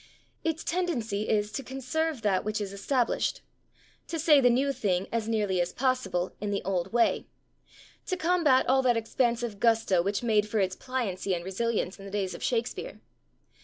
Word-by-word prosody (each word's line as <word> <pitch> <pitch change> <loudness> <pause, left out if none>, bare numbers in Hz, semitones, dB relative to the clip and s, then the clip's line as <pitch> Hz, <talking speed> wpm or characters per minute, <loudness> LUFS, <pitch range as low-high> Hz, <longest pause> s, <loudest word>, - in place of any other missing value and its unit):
Its 325 -1 -1
tendency 240 - -1
is 210 -1 +1
to - - -3
conserve 270 +2 -2
that 195 -3 +2
which 215 +1 -2
is 200 -2 -4
established; 240 +4 0 0.7
to 330 - -3
say 300 -3 +5
the 250 - +5
new 270 +3 +2
thing, 190 -6 0
as 225 -1 -1
nearly 205 -5 +1
as 175 - -1
possible, 225 -9 -1
in 210 - -2
the 200 -1 -1
old 185 -1 -1
way; 235 0 +2 0.8
to 370 - -1
combat 330 -7 +3
all 265 +1 +4
that 245 -3 +3
expansive 235 -1 -1
gusto 225 -6 +3
which 200 +5 -1
made 215 -2 +2
for 220 - -1
its 185 -1 +1
pliancy 200 -8 -2
and 170 0 -6
resilience 200 -1 -1
in 195 - -10
the - - -7
days 195 -2 -2
of - - -8
Shakespeare. 235 -1 -2
225 Hz, 175 wpm, -28 LUFS, 200-260 Hz, 0.8 s, say